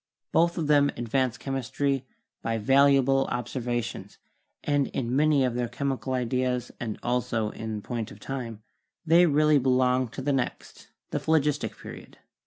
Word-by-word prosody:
Both 170 +1 +2
of 165 - -1
them 145 -1 +4
advanced 125 +1 -1
chemistry 135 0 -2 0.3
by 115 0 -1
valuable 135 +3 +4
observations, 120 -1 -4 0.5
and 145 -2 +1
in 125 -1 -2
many 145 -2 +4
of 125 - -1
their 120 0 -1
chemical 135 0 -3
ideas 125 0 -1
and 110 -3 -4
also 115 -3 -1
in 110 -2 -5
point 115 -3 -4
of - - -13
time, 115 -5 -6 0.4
they 170 +2 +6
really 150 0 +4
belong 130 0 +2
to 130 +4 -8
the 145 +1 +1
next, 130 -2 -4 0.2
the - - -1
Phlogistic, 150 -2 0
Period. - - -11
130 Hz, 145 wpm, -27 LUFS, 120-140 Hz, 0.5 s, they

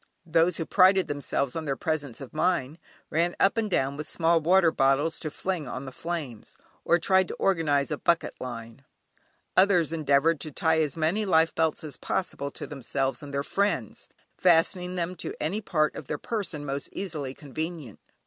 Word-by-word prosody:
Those 165 +2 +2
who 165 - -2
prided 190 +1 +5
themselves 140 -2 -2
on 160 -1 -3
their 140 -2 -1
presence 145 -5 -3
of 135 - -9
mind, 160 -2 0 0.3
ran 170 +2 +1
up 195 - +4
and 225 -2 0
down 140 -6 0
with 150 - -5
small 165 0 +3
water 175 +1 +4
bottles 140 +4 +2
to 155 - -4
fling 170 -1 -3
on 130 +2 -5
the 130 - -7
flames, 150 -7 -6 0.3
or 170 - +4
tried 190 +2 +3
to - - -6
organise 155 -6 +1
a 150 - -2
bucket 170 -1 +1
line. 115 0 -7 0.7
Others 180 -4 +4
endeavoured 155 0 +2
to 155 +2 -5
tie 160 +2 +2
as 150 -1 0
many 165 +7 +1
life 165 -4 +3
belts 160 -1 0
as 150 -4 -7
possible 140 -6 -3
to - - -7
themselves 135 -2 -2
and 145 -1 -8
their 140 0 -1
friends, 200 +7 -1 0.3
fastening 180 +1 +2
them 175 0 -2
to - - -5
any 185 +8 -1
part 155 -6 +1
of 135 - -8
their 150 - -2
persons 190 - -4
most 140 0 -4
easily 150 -9 -4
convenient. 155 - -6
160 Hz, 180 wpm, -27 LUFS, 140-175 Hz, 0.7 s, prided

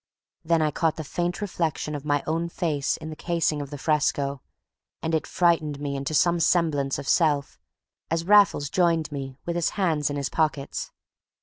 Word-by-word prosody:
Then 165 -1 +2
I 155 - +1
caught 160 +2 0
the 160 - -5
faint 175 +5 -2
reflection 165 -6 -2
of 145 -1 -5
my 145 -1 +1
own 165 +2 -1
face 155 -5 -1
in 155 0 -7
the - - -6
casing 165 -2 0
of 140 - -6
the 145 - -6
fresco, 140 -2 0 0.6
and 160 - -1
it 160 - 0
frightened 160 -5 +1
me 140 -1 -3
into 140 +3 -3
some 170 +3 +3
semblance 155 -5 +2
of - - -6
myself 145 -3 +1 0.5
as 165 +1 -1
Raffles 195 -8 +4
joined 165 -4 +2
me 135 -2 -6
with 170 - -2
his 170 -2 +1
hands 160 -7 +1
in 145 - -3
his 140 -1 -2
pockets. 150 -3 -1
155 Hz, 185 wpm, -25 LUFS, 145-170 Hz, 0.6 s, Raffles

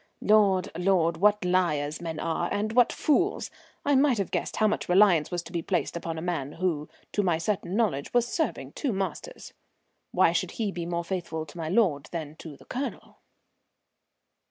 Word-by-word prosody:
Lord! 200 -4 +4
Lord! 175 -2 +2
what 205 +2 +3
liars 160 -5 +1
men 165 -2 -4
are 170 +1 -1
and 215 +2 -1
what 245 -1 +5
fools! 360 +7 +1 0.3
I 285 - +3
might 270 -2 +4
have 200 -3 -2
guessed - - -2
how 215 - +2
much 210 - -2
reliance 180 -5 +5
was 175 -1 -3
to 165 - -11
be 170 -1 -2
placed 175 +1 -1
upon 165 -1 -4
a 160 - -5
man 155 -5 -2
who, 165 -4 -2 0.2
to 205 - +1
my 175 -5 +1
certain 185 +1 -2
knowledge, 195 -12 0
was 245 -1 +3
serving 320 +5 -2
two 275 -7 -2
masters. 195 - -5 0.6
Why - - +4
should - - -1
he 215 -4 -1
be 170 -2 -5
more 170 0 -2
faithful 170 -3 -4
to 150 - -14
my 160 -1 -3
lord 160 - +2
than 155 -3 -5
to 150 -4 -10
the - - -18
Colonel? 265 +3 -5
180 Hz, 185 wpm, -27 LUFS, 165-210 Hz, 0.6 s, what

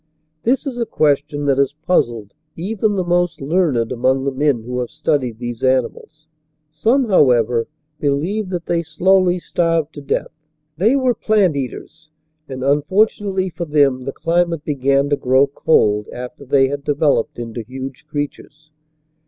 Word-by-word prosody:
This 260 +5 +1
is 255 -3 -4
a 235 - -1
ques 145 -2 +2
tion 145 -1 -5
that 140 -1 +2
has 140 +1 +1
puzzled 115 - 0 0.2
even 205 +4 -1
the 185 - 0
most 175 -2 0
learned 140 -6 0
among 130 +2 +1
the 140 - 0
men 135 -3 0
who 125 +2 -4
have 125 - -3
studied 145 -6 -1
these 120 -1 -6
animals. 130 +4 -1 0.5
Some, 230 - +1
however, 120 - +3 0.3
believe 170 +9 -1
that 175 -3 -4
they 170 -1 0
slowly 180 +3 +2
starved 165 -3 -1
to 145 - -9
death. 140 - -2 0.4
They 210 - +3
were 260 -2 +2
plant 210 -7 +2
eaters, 140 +4 -6 0.4
and 130 -1 -5
unfortunately 190 +6 +1
for 170 +1 -5
them 140 -4 +2
the 135 - -3
climate 170 0 0
began 140 -1 +1
to - - +4
grow 130 +2 +3
cold 105 -7 +1
after 125 +3 -8
they 135 0 +3
had 140 0 -4
de 145 - 0
veloped 145 -6 +1
into 120 0 -5
huge 130 +3 -8
creatures. 145 +1 -6
145 Hz, 160 wpm, -19 LUFS, 130-175 Hz, 0.5 s, to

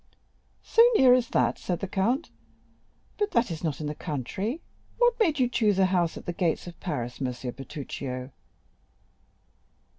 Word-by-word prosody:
"So 455 - +4
near 255 -7 +7
as 250 -2 +2
that?" 125 -1 +1
said 175 -2 -2
the 195 - -3
Count; 220 - 0 0.9
"but 415 0 +1
that 235 -5 +2
is 160 0 -5
not 155 -4 -2
in 155 - -4
the 150 - -2
country. 180 - -3 0.4
What 485 0 +4
made 330 -9 +3
you 255 -2 +3
choose 220 -5 +2
a 190 - +5
house 180 -3 +1
at - - -10
the 175 - -3
gates 170 -3 0
of 175 -1 -10
Paris, 125 -7 -4
M. 130 - +1
Bertuccio?" 130 +1 -6
180 Hz, 160 wpm, -27 LUFS, -, 0.9 s, near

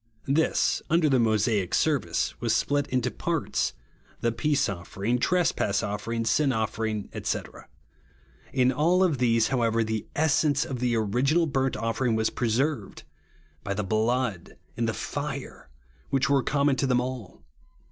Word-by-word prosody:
This, 150 +4 +1
under 160 -2 +3
tlie 130 -2 +4
Mosaic 110 -4 +1
service, 150 -4 0
w^as 120 - -1
split 145 +5 +1
into 125 -1 0
parts, 165 -4 -1 0.2
— - - -32
the 115 - +1
peace 140 +4 +1
offering, 100 +5 -2
trespass 145 - +1
offering, 115 +3 -3
sin 140 +3 +2
offering, 110 -2 -2 0.2
&c. - - 0 1.1
In 130 -1 +3
all 170 +8 +3
of 160 -8 +1
these, 115 -2 +3
however, 115 -3 +1
the 110 -1 -3
essence 155 -1 +2
of 130 -3 -5
the 120 -1 +1
original 125 +10 +2
burnt 135 -3 0
offering 115 +1 0
w^as 110 0 0
preserved, 125 0 -1 0.3
— - - -34
by 100 - -3
the 105 - -1
blood 110 -1 -1 0.2
and - - 0
the - - -1
fire, - - -5 0.4
which 135 -1 +1
were 140 -1 +4
common 140 +1 +1
to 135 - +1
them 125 -1 +3
all. 125 -5 -6
125 Hz, 150 wpm, -26 LUFS, 110-140 Hz, 1.1 s, tlie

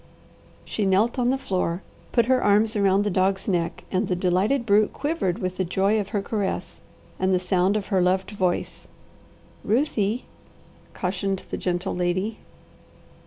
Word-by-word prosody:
She 215 - -2
knelt 215 +7 +2
on 245 0 +2
the 265 - +2
floor, 185 -7 -2 0.3
put 235 -2 +3
her 255 +1 +2
arms 210 +2 +3
around 200 -1 +3
the 205 - -1
dog's 190 +1 +1
neck, 175 -4 -1
and 190 +2 0
the 180 - 0
delighted 190 +8 +1
brute 210 0 +3
quivered 285 - -1
with 185 -4 -3
the 185 - +1
joy 195 +4 +1
of 200 -1 -3
her 205 -1 -1
caress 205 -2 -3 0.4
and 190 0 +1
the - - +2
sound 185 +2 +2
of 205 - -3
her 190 - +4
loved 185 +3 +1
voice. 185 -4 -2 0.8
"Ruthie!" 230 -3 0 0.7
cautioned 190 +1 -2
the - - -1
gentle 180 +1 -2
lady. 185 +5 -1
195 Hz, 160 wpm, -24 LUFS, 185-215 Hz, 0.8 s, her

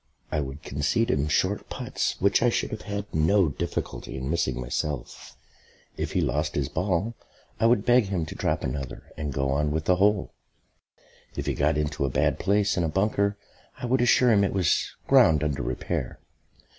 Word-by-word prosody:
I 75 - 0
would 70 0 -5
concede 80 - 0
him 75 +1 +1
short 75 - 0
putts - - -3
which 100 +1 +3
I 120 - +4
should - - -1
have 110 - -5
had 100 0 -4
no 85 +3 +3
difficulty 70 - -4
in 65 +2 -3
missing 85 -7 0
myself; 70 +4 -4 0.6
if - - -4
he - - +2
lost 75 +1 -1
his 70 -2 -1
ball 95 +5 -1 0.5
I 115 - +4
would 115 -3 +3
beg 120 -2 +5
him 95 -4 -2
to - - -7
drop - - -1
another 65 +1 -5
and 75 -3 -4
go 70 0 -1
on 75 +2 +1
with 80 +2 -2
the 90 0 +3
hole; 100 0 +2 1.0
if - - -4
he - - 0
got 75 - +1
into 75 -1 -1
a 70 - +1
bad - - +1
place 100 +1 +2
in 90 - +2
a 80 - 0
bunker 100 +3 +1 0.4
I - - -5
would 125 +1 +2
assure 125 0 +5
him 100 -2 +4
it 100 - 0
was 90 -5 +1 0.2
ground 75 -2 +5
under 70 -2 -1
repair. - - -3
85 Hz, 190 wpm, -26 LUFS, 75-100 Hz, 1.0 s, beg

